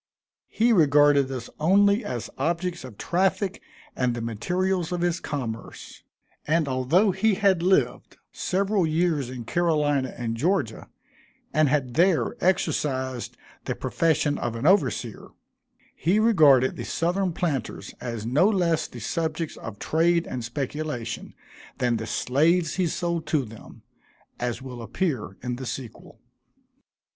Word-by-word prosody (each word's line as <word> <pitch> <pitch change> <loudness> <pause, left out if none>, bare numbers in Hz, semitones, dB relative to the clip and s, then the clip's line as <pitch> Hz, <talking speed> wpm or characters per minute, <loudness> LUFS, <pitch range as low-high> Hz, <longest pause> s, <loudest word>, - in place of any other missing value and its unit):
He 235 +2 +2
regarded 145 -5 +4
us 125 -3 -5
only 200 +7 +4
as 120 -2 -5
objects 170 +5 -2
of 125 -6 -10
traffic 190 +2 0 0.3
and 125 -2 0
the 120 - -4
materials 180 - -1
of 175 -1 -2
his 175 0 0
commerce; 120 -6 -6 0.5
and 160 0 +2
although 135 +11 +2
he 200 +3 +2
had 195 -3 +3
lived 185 +2 +1
several 195 -1 0
years 155 -4 0
in 125 -2 -6
Carolina 145 -4 +1
and 115 -2 -3
Georgia, 150 - -1 0.6
and 155 -2 +3
had 130 -4 0
there 165 -5 +3
exercised 135 -8 0 0.3
the - - -2
profession 155 -3 0
of 120 -1 -3
an 115 +4 -4
overseer, 160 - +1 0.7
he 180 +6 +1
regarded 150 - +5
the - - -4
Southern 180 +3 0
planters 155 -9 -3
as 115 -3 -4
no 145 - +3
less 175 -6 +1
the 120 - -10
subjects 160 +6 -2
of 110 -2 -8
trade 170 +5 +2
and 125 - -5
speculation 130 -1 -4 0.4
than 120 -2 +1
the 110 0 -5
slaves 160 +8 +2
he 185 -2 +2
sold 170 -1 -2
to 150 -5 +1
them; 110 0 -13 0.6
as 120 +1 -3
will 125 -2 -8
appear 120 - -3
in 125 -1 -3
the 130 - -6
sequel. 120 0 -8
155 Hz, 135 wpm, -25 LUFS, 125-175 Hz, 0.7 s, regarded